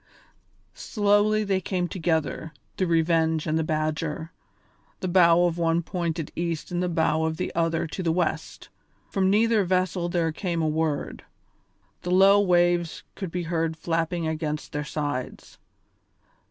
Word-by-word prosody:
Slowly 210 0 +2
they 195 -2 0
came 180 -1 -1
together, 160 -3 -2 0.2
the 185 - +1
Revenge 160 -1 +2
and 155 - 0
the 160 - +1
Badger, 155 +1 -2 0.7
the 185 - -3
bow 175 -1 +5
of 175 -1 -1
one 165 0 +1
pointed 170 -3 -3
east 170 -1 -3
and 175 0 -1
the 180 - 0
bow 160 -1 +1
of 160 0 -1
the - - -3
other 165 0 0
to 165 +4 -5
the 170 -3 +1
west; 160 -2 -2 0.4
from 190 -2 +2
neither 220 +1 +3
vessel 185 -1 0
there 170 -2 0
came 170 +1 -3
a - - +1
word; 155 -1 -2 0.8
the 180 - -5
low 195 +2 +6
waves 175 -3 +2
could 190 -4 -5
be 180 +1 -3
heard 165 -1 -1
flapping 165 +1 -1
against 155 -2 -3
their 150 0 -3
sides. 145 -4 -5
170 Hz, 150 wpm, -25 LUFS, 160-180 Hz, 0.8 s, low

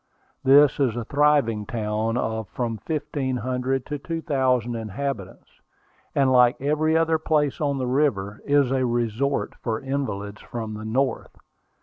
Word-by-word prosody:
This 140 +1 +6
is 130 -5 +2
a 120 -2 -4
thriving 140 -8 +2
town 110 0 -1
of 110 -4 -2
from 115 -1 -3
fifteen 145 0 -2
hundred 130 +2 -1
to 145 -1 -4
two 165 +2 -4
thousand 130 -5 +1
inhabitants, 110 -1 -6 0.5
and, 135 -2 +3
like 125 -1 +5
every 155 +3 +1
other 165 -1 +2
place 150 -3 0
on 140 -2 0
the 130 - -1
river, 125 -7 0
is 140 -2 +3
a 130 -1 +1
resort 120 +3 -1
for 110 -2 -2
invalids 105 -7 -4
from 110 -2 -6
the 105 +1 -7
North. 125 +3 -1
130 Hz, 145 wpm, -24 LUFS, 110-140 Hz, 0.5 s, This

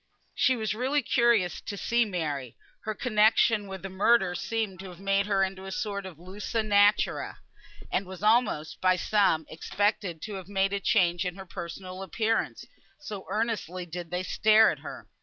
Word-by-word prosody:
She 260 -1 +3
was 220 -3 -2
really 260 +5 0
curious 235 -7 +2
to 200 - -6
see 235 +3 +1
Mary; 150 - -4 0.3
her 215 0 -2
connexion 215 -2 +3
with 190 -1 -7
a - - -4
murderer 190 0 +3
seemed 195 0 -3
to 190 0 -8
have 180 -1 -12
made 195 +1 +1
her 195 -2 +2
into 190 0 -4
a 195 - -6
sort 200 -4 -3
of 175 -5 -11
lusus 205 +5 -4
naturæ, 205 0 +2 0.5
and 195 - -1
was 190 +1 -9
almost, 210 -9 +2
by 185 0 +4
some, 180 -4 +2
expected 195 0 -1
to 215 - -5
have 185 -2 -9
made 195 0 0
a 200 - 0
change 175 -3 +2
in 180 -1 -3
her 190 -1 -9
personal 185 +1 -7
appearance, 220 +4 -1 0.3
so 215 -10 -8
earnestly 205 -4 -2
did 175 0 -7
they 180 +1 -2
stare 215 +3 +5
at - - -7
her. - - -9
195 Hz, 175 wpm, -28 LUFS, 185-215 Hz, 0.5 s, stare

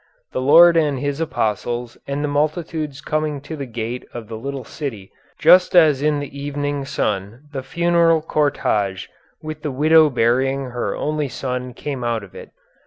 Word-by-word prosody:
The 130 - -2
Lord 170 +5 +7
and 150 -4 +2
His 145 +3 -2
Apostles 120 -4 -2
and 140 +1 -2
the - - 0
multitudes 150 0 -2
coming 155 -1 -2
to 160 +3 -7
the 140 -3 -6
gate 120 +1 -5
of 115 -2 -7
the 115 - -5
little 135 +3 -5
city 110 -7 -7 0.3
just 180 0 +5
as 155 -6 +5
in 150 0 +1
the 145 -1 -7
evening 145 0 -3
sun 105 0 -3
the 135 - -3
funeral 170 +3 +2
cortège 105 -11 0 0.3
with 155 -1 -6
the 150 - -3
widow 155 +3 +5
burying 130 +2 +1
her 120 0 -2
only 150 -1 -1
son 125 -1 -4
came 140 -4 -5
out 115 -2 -1
of 100 - -14
it. - - -10
140 Hz, 170 wpm, -20 LUFS, 125-155 Hz, 0.3 s, Lord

